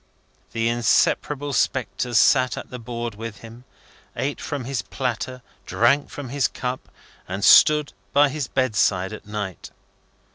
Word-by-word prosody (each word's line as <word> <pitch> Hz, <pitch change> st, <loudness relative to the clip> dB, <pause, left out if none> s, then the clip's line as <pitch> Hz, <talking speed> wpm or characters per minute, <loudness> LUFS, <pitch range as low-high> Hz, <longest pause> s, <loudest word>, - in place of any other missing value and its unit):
The 115 Hz, 0 st, 0 dB
inseparable 135 Hz, +4 st, +1 dB
spectres 125 Hz, -2 st, 0 dB
sat 130 Hz, -2 st, +4 dB
at -, -, -8 dB
the 125 Hz, -, -6 dB
board 120 Hz, 0 st, -5 dB
with 110 Hz, +1 st, -8 dB
him, 115 Hz, +2 st, -12 dB, 0.5 s
ate 140 Hz, +1 st, -3 dB
from 145 Hz, -4 st, -4 dB
his 135 Hz, -1 st, -2 dB
platter, 125 Hz, 0 st, -4 dB, 0.2 s
drank 140 Hz, +5 st, +2 dB
from 140 Hz, -3 st, -7 dB
his 140 Hz, -1 st, +1 dB
cup, 125 Hz, 0 st, -5 dB, 0.4 s
and 95 Hz, +2 st, -4 dB
stood 150 Hz, -1 st, +6 dB, 0.2 s
by 145 Hz, +3 st, +5 dB
his 145 Hz, -2 st, -3 dB
bedside 105 Hz, -7 st, +1 dB
at 110 Hz, -, -10 dB
night. 105 Hz, -3 st, -5 dB
125 Hz, 140 wpm, -23 LUFS, 115-135 Hz, 0.5 s, stood